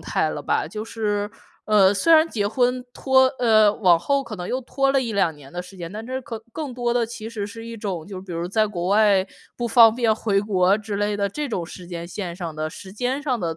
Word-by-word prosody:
态 - - 0
了 - - -5
吧， - - 0
就 215 0 -6
是， 210 -2 -2 0.4
呃， 200 -3 +5
虽 205 +12 +3
然 320 0 +6
结 205 -7 -1
婚 250 +3 0
拖 265 -1 +4
呃， 215 -3 +5
往 180 -6 +4
后 280 +10 0
可 225 -5 -8
能 180 -1 -6
又 255 +1 -1
拖 270 +2 0
了 270 - +3
1-2 200 -9 0
年 140 -2 -15
的 175 - -4
时 180 +2 -12
间， 170 -2 -7
但 215 +2 -6
这 260 +1 -3
可 225 -2 -7
更 295 -2 -5
多 240 -1 -1
的 240 -1 +2
其 225 -1 -7
实 220 -3 -4
是 225 +2 -9
一 230 0 -7
种 190 -7 -4
就 190 -2 -7
比 190 -2 -9
如 170 +1 -3
在 215 +4 +2
国 175 -4 -4
外， 200 -2 +4 0.3
不 240 - -2
方 230 -1 +7
便 230 -2 +2
回 205 -2 +1
国 195 -1 +2
之 215 -1 -6
类 205 0 0
的， 200 -1 0
这 295 +8 -4
种 180 -8 -3
时 180 +1 -10
间 170 -1 -6
线 175 -1 -5
上 170 -4 -5
的 155 0 -3
时 190 +3 -11
间 250 +6 -2
上 265 -4 -1
的 165 -2 -2
210 Hz, 260 characters per minute, -23 LUFS, 190-240 Hz, 0.4 s, 方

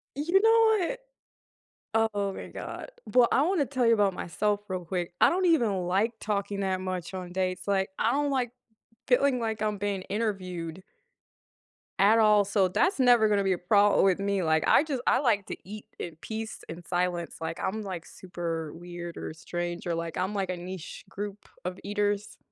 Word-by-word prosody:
You 340 +7 +2
know 445 -3 +5
what - - -4 1.1
Oh 200 -1 -1
my - - -7
god. - - -7 0.2
Well, 245 -2 +4
I 270 - +4
wanna 335 -3 +2
tell 255 -1 0
you 230 - +6
about 205 -3 +3
myself 205 +5 -1
real 185 -2 -3
quick, 175 0 -3
I - - +7
don't 370 +1 +1
even 220 - +2
like 200 +6 +1
talking 200 -1 -2
that 190 -1 0
much 185 -1 -4
on 180 -1 -6
dates, 185 -1 -2
like, 195 -1 +1
I 230 - +2
don't 290 +1 +1
like 255 -3 0 0.6
feeling 255 0 +3
like 220 -1 -2
I'm 210 -1 -1
being 200 -1 -2
interviewed 185 -5 -3 1.2
at 210 +3 +6
all, 210 -2 +5
so 200 -2 +2
that's 355 - +1
never 245 -3 +6
gonna 200 -1 +2
be 190 - +1
a 180 - 0
problem 205 +3 +4
with 190 -1 +3
me, 200 -1 0
like, 160 -2 +2
I - - +6
just 275 -6 -3
I - - +4
like 225 -7 +2
to - - -5
eat 210 +3 -9
in 170 -2 -5
peace 220 0 -6
and 165 +2 -8
silence, 175 -1 -1
like, 165 +1 -4
I'm 215 +3 -2
like 185 -4 -6
super 165 -4 -5
weird 175 0 -8
or - - -5
strange 175 +1 -4
or 175 - -1
like 165 0 -4
I'm 190 +3 -1
like 195 -2 -1
a 180 - -2
niche 180 -1 -8
group 205 +1 -6 0.2
of 180 +1 -4
eaters. 205 0 -1
200 Hz, 190 wpm, -28 LUFS, 180-225 Hz, 1.2 s, I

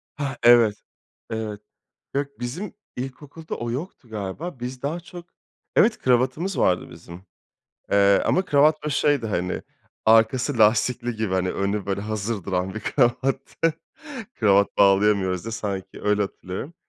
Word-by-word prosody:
Hah, 140 -4 -4
evet, 120 -3 +6 0.5
evet. 110 -2 -4 0.5
Yok, 140 +1 0
bizim 150 +13 -5 0.2
ilkokulda 140 +5 -7
o 120 0 -4
yoktu 140 0 -6
galiba. 110 - -5
Biz 125 +1 -6
daha 155 +5 -2
çok 175 0 -11 0.5
Evet, 220 +1 +4
kravatımız 130 +9 +1
vardı 90 -1 +1
bizim, 85 +2 -12 0.7
eee, 100 0 +5
ama 185 +1 +2
kravat 150 +1 +3
böyle 150 -1 -2
şeydi 145 -6 +2
hani, 90 -2 -2 0.4
arkası 115 +4 +4
lastikli 120 +3 +3
gibi 110 -3 -2
hani 95 -1 0
önü 100 0 -2
böyle 100 0 -2
hazır 105 -1 -3
duran 95 -1 -2
bir 110 - -4
kravattı. 135 +6 0 0.6
Kravat 100 -2 +3
bağlayamıyoruz 100 -2 +3
diye. 115 - -5
Sanki, 100 -3 -5
öyle 105 0 +2
hatırlıyorum. 100 - -5
115 Hz, 135 wpm, -24 LUFS, 100-135 Hz, 0.7 s, evet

